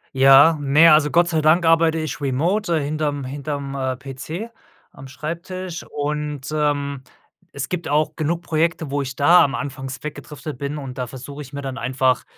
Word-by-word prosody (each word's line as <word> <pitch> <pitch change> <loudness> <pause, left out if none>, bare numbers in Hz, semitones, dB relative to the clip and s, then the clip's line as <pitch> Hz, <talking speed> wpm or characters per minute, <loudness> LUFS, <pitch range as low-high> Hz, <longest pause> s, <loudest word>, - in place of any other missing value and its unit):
Ja, 135 +4 +7
ne, 150 +4 +6
also 150 -1 +4
Gott 170 0 +4
sei 160 -2 0
Dank 165 +3 +4
arbeite 165 0 +4
ich 155 -3 -4
remote 165 +8 0
äh, - - -1
hinter'm 145 -1 -2
hinter'm, 140 0 -5
äh, 130 -1 -2
PC 140 - -7 0.4
am 135 - -12
Schreibtisch 170 +5 -6
und, 150 -1 -4
ähm, 145 -3 -1 0.5
es 140 -2 -5
gibt 180 -1 -3
auch 150 +1 +1
genug 165 +2 -1
Projekte, 165 -2 -1
wo 145 0 0
ich 130 0 -6
da 170 +5 +6
am 140 -1 0
anfangs 135 0 -6
weggedriftet 150 -1 -7
bin, 140 +1 -3
und 135 -2 -7
da 125 - -1
versuche 140 +3 -9
ich 135 - -14
mir 140 - -5
dann 135 -1 -5
einfach, 130 0 +1
145 Hz, 180 wpm, -21 LUFS, 135-160 Hz, 0.5 s, Ja